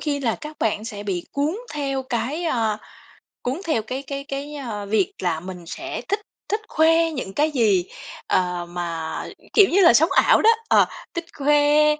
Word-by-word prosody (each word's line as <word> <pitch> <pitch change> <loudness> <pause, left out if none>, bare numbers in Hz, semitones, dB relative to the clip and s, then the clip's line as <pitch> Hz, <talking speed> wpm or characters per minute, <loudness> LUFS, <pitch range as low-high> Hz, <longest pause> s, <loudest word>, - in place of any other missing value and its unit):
khi 285 -2 -1
là 230 -4 +1
các 305 -1 -9
bạn 215 0 0
sẽ 210 -3 -6
bị 185 -4 -3
cuốn 295 +7 0 0.2
theo 275 -2 -2
cái, 260 +6 -2
a, 225 -8 0 0.6
cuốn 260 +7 -2
theo 310 -9 +1
cái 255 +5 -5
cái 275 0 -5
cái, 280 +1 -5
ơ, 225 -8 -5
việc 200 -1 +1
là 165 -3 0
mình 180 -1 -8
sẽ - - -5
thích 405 +1 0 0.3
thích 420 +2 0
khoe 325 +1 +4
những 255 -9 -5
cái 300 +2 +2
gì, 215 -10 +3 0.4
ờ, 180 -1 0
mà, 170 -2 -4 0.3
kiểu 410 - +7
như 385 - +4
là, 340 - +8
sống 315 +7 +5
ảo - - +5
đó, 445 - +7 0.2
ờ, - - +5 0.3
thích 340 -1 -3
khoe, 295 +1 +4
270 Hz, 185 wpm, -23 LUFS, 205-300 Hz, 0.6 s, là